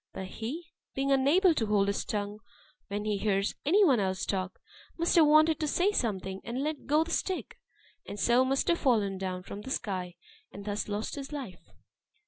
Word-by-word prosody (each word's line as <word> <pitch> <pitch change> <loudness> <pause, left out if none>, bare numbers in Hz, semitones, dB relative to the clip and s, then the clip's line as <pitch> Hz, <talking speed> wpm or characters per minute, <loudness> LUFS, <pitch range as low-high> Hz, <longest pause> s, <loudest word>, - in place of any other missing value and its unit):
But 190 - -5
he, 315 - -6 0.2
being 275 +1 0
unable 305 +7 +4
to 225 -8 -1
hold 205 -1 +2
his 200 - -1
tongue 205 0 -3 0.5
when 205 +1 -4
he 210 -1 0
hears 200 -1 +1
any 395 +6 +5
one 265 -9 +4
else 190 -1 -1
talk, 185 -2 -3 0.4
must 335 0 +1
have 320 -3 +7
wanted 310 +1 +5
to 310 - -1
say 360 +7 +2
something, 190 - -2
and 245 +4 -3
let 305 0 -4
go 300 +3 +4
the 335 - -8
stick; 375 +2 -3 0.5
and 205 - -6
so 240 +4 +4
must 265 +1 0
have 340 - +2
fallen 205 -8 +1
down 185 -1 -4
from 200 - -8
the 235 - -8
sky, 185 -8 -3 0.4
and 200 0 -10
thus 205 0 -2
lost 210 +1 -3
his 280 0 -6
life." 255 -12 -6
230 Hz, 195 wpm, -29 LUFS, 200-300 Hz, 0.5 s, have